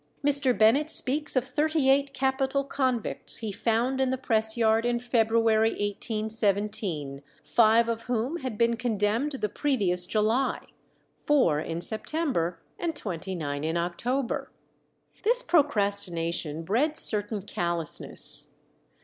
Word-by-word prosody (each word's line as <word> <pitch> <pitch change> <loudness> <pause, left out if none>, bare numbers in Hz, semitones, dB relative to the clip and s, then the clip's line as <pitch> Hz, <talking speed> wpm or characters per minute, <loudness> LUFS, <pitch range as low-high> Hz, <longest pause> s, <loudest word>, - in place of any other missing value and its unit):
Mr. 280 -5 +2
Bennet 240 +9 +4
speaks 300 +1 +1
of 255 -1 +1
thirty 300 +2 0
eight 275 +1 +3
capital 270 +1 0
convicts 260 -4 0
he 220 -3 -4
found 235 +6 0
in 260 - +1
the 260 - -1
press 220 -3 +2
yard 225 -1 +3
in 240 0 0
February 225 -2 +2
1817, 205 - -2 0.2
five 230 0 +4
of 230 0 -3
whom 245 +6 -2
had 255 -8 -5
been 235 +1 +2
condemned 225 +4 -1
the 255 -6 -2
previous 195 -8 0
July, 220 +6 0 0.7
four 255 - +3
in 165 +2 -4
September, 215 - -2 0.2
and 335 -2 -2
twenty 190 - -4
nine 145 -3 -4
in 160 +2 -1
October. 235 +10 -2 0.7
This 485 +3 +2
procrastination 200 - +1
bred 265 - 0
certain 205 -1 +2
callousness. 170 -5 -1
225 Hz, 125 wpm, -27 LUFS, 200-265 Hz, 0.7 s, Bennet